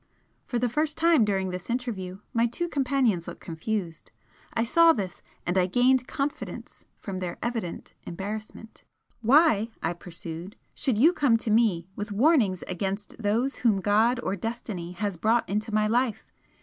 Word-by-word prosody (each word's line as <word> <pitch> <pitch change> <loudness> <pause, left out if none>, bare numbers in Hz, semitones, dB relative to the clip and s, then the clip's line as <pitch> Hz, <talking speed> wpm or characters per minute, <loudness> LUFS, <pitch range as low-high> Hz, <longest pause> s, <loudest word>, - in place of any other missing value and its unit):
For 245 - -1
the 245 +1 +1
first 300 +5 -1
time 330 -6 +5
during 190 -3 0
this 180 +3 -6
interview, 210 -7 -3
my 230 0 +3
two 345 +9 -3
companions 260 - +1
looked - - -7
confused. 170 +1 -4 0.5
I 225 - +2
saw 330 +7 +6
this, 190 - -5 0.2
and 180 +2 +2
I 180 - +2
gained 250 +5 +3
confidence 285 0 -5
from 190 -2 -5
their 180 -2 -4
evident 230 -8 -4
embarrassment. 215 +4 -7 0.4
"Why," 235 -3 +4
I 165 - 0
pursued 175 +2 -8 0.2
"should 260 -7 -1
you 315 +10 +6
come 265 -9 +3
to 225 -1 -3
me 210 -7 +3
with 205 +1 -5
warnings 215 - +3
against 195 +4 -4
those 230 +6 0
whom 220 -5 +2
God 220 +5 +3
or 195 - -1
Destiny 200 -4 -5
has 200 -1 -3
brought 225 +7 +2
into 215 +3 -2
my 215 0 +2
life? 235 +1 0
215 Hz, 160 wpm, -27 LUFS, 190-245 Hz, 0.5 s, saw